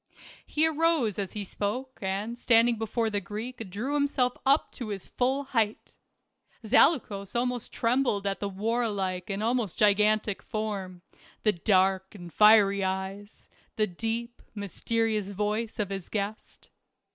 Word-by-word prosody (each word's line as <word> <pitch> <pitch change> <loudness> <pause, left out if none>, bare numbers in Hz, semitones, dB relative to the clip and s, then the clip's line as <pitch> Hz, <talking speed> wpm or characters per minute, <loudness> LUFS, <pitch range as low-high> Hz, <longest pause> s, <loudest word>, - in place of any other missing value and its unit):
He 310 +1 +2
arose 320 - +1
as 195 -3 -3
he 210 - -4
spoke 230 +7 -4
and 200 +4 -2
standing 235 -1 +3
before 225 0 -1
the 205 -1 -1
Greek 220 +3 -6
drew 225 +10 -3
himself 280 -4 +1
up 280 +3 +4
to 240 - -6
his 200 -3 -6
full 265 +3 0
height. 225 -6 -1 0.7
Zaleukos 215 - +2
almost 245 0 -1
trembled 230 -4 +1
at 195 -1 -1
the 200 - -2
war 225 +4 -1
like 185 -3 -3
and 200 +1 -2
almost 230 -5 0
gigantic 210 0 +3
form, 195 -5 -4 0.4
the 215 - +3
dark 190 +1 +1
and 175 -4 -10
fiery 205 -2 +6
eyes, 190 +2 -4 0.3
the 215 - +2
deep, 225 +5 -4
mysterious 215 +1 -1
voice 210 +3 -2
of 205 -4 -2
his 195 -3 -5
guest. 210 0 -5
215 Hz, 140 wpm, -28 LUFS, 200-235 Hz, 0.7 s, fiery